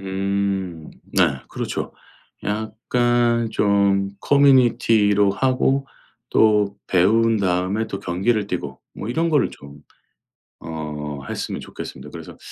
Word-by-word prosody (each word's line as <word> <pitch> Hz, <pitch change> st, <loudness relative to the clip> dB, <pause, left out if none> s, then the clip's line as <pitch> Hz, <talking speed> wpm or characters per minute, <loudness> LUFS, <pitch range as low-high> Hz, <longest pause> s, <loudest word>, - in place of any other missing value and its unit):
음. 95 Hz, -3 st, -2 dB, 0.2 s
네. 80 Hz, -8 st, +2 dB
그렇죠. -, -, -4 dB, 0.5 s
약간 115 Hz, +2 st, 0 dB
좀 100 Hz, -2 st, +2 dB
커뮤니티로 115 Hz, -7 st, +4 dB
하고 135 Hz, +5 st, +1 dB, 0.4 s
또 105 Hz, -2 st, +3 dB
배운 110 Hz, +5 st, +3 dB
다음에 95 Hz, +3 st, 0 dB
또 100 Hz, -, -5 dB
경기를 100 Hz, +4 st, 0 dB
뛰고 70 Hz, -8 st, -5 dB
뭐 105 Hz, -, -6 dB
이런 165 Hz, +7 st, 0 dB
거를 150 Hz, -4 st, +2 dB
좀 70 Hz, +1 st, -14 dB, 0.8 s
어 75 Hz, -3 st, -6 dB
했으면 -, -, -4 dB
좋겠습니다. -, -, -9 dB
그래서 -, -, -10 dB
100 Hz, 215 characters per minute, -22 LUFS, 95-115 Hz, 0.8 s, 커뮤니티로